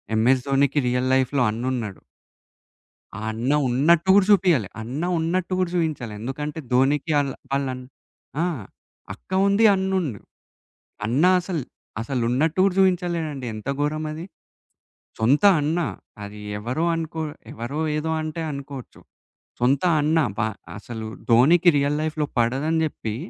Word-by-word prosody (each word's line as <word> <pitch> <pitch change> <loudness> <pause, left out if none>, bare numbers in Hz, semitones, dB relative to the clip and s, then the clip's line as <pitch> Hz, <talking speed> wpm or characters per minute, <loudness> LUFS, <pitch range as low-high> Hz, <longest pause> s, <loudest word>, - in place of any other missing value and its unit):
'MS 125 +3 +3
ధోనికి' 140 +1 +2
real 125 +1 0
లైఫ్‌లో 130 0 +2
అన్నున్నాడు. 115 -3 -4 1.2
ఆ - - -6
అన్న 120 +5 -1 0.2
ఉన్నట్టు 160 +8 +3
గూడా 200 -1 +5
జూపియాలే. 175 - +4
అన్న 130 +8 -5 0.2
ఉన్నట్టు 175 +3 -1
గూడా 185 -2 0
జూయించలే. 155 -10 -2
ఎందుకంటే, 145 +6 -5
'ధోనికి' 140 +5 +2
ఆళ్ళ, 140 -2 0 0.2
వాళ్ళన్ 130 -2 -1 0.6
ఆ! - - +2 0.7
అక్క 110 - -26 0.2
ఉంది 200 +3 +3
అన్న 190 0 -1
ఉన్ 165 - -2 1.0
అన్న 125 +8 +1 0.2
అసలు 180 -3 -3 0.4
అసలు 125 +2 -2
ఉన్నట్టు 155 +7 +1
గూడా 195 -1 +3
చూపించలేదండి 170 -7 0
ఎంత 110 +3 -8
ఘోరం 150 +2 -1
అది. 160 +3 -6 0.9
సొంత 125 +7 +3 0.2
అన్న 155 +4 0 0.5
అది 105 +1 -9 0.2
ఎవరో 125 +10 -2
అనుకో 160 0 -4 0.3
ఎవరో 120 +6 -5 0.2
ఏదో 155 +1 -2
అంటే 155 +1 -4
అనుకోవచ్చు. 140 -2 -8 0.6
సొంత 130 +5 +2 0.2
అన్న 155 +2 +2 0.2
బ - - -4 0.4
అసలు 110 +1 -7 0.2
'ధోనికి' 160 +10 +6
రియల్ 140 +1 +1
లైఫ్‌లో 155 -1 -1
పడదని 135 +8 +1
జెప్పి, 115 -8 -3
145 Hz, 130 wpm, -23 LUFS, 125-160 Hz, 1.2 s, ధోనికి